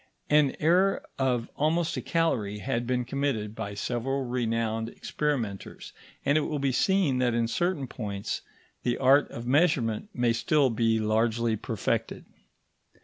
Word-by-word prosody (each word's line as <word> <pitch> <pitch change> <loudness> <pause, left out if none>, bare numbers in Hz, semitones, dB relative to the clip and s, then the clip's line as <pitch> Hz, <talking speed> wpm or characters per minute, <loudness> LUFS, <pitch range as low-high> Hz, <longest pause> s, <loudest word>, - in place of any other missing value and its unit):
An 150 -2 +4
error 180 +5 +3
of 125 -3 +1
almost 160 +3 +1
a - - -3
calorie 115 -12 0
had 120 +2 -2
been 125 -1 0
committed 125 -5 -2
by 105 -2 -5
several 125 +5 -2
renowned 115 -2 -1
experimenters, 120 -9 -3 0.3
and 145 +2 +4
it - - 0
will 150 - -2
be 140 -1 +1
seen 170 -3 +2
that 120 -2 +2
in 115 -1 +1
certain 175 +4 -1
points 100 -5 -4 0.4
the 120 0 0
art 135 +2 +4
of 115 - -7
measurement 135 - +2
may 120 -6 +1
still 135 +3 +2
be 115 0 +2
largely 110 +1 +1
perfected. - - -2
125 Hz, 145 wpm, -27 LUFS, 115-145 Hz, 0.4 s, An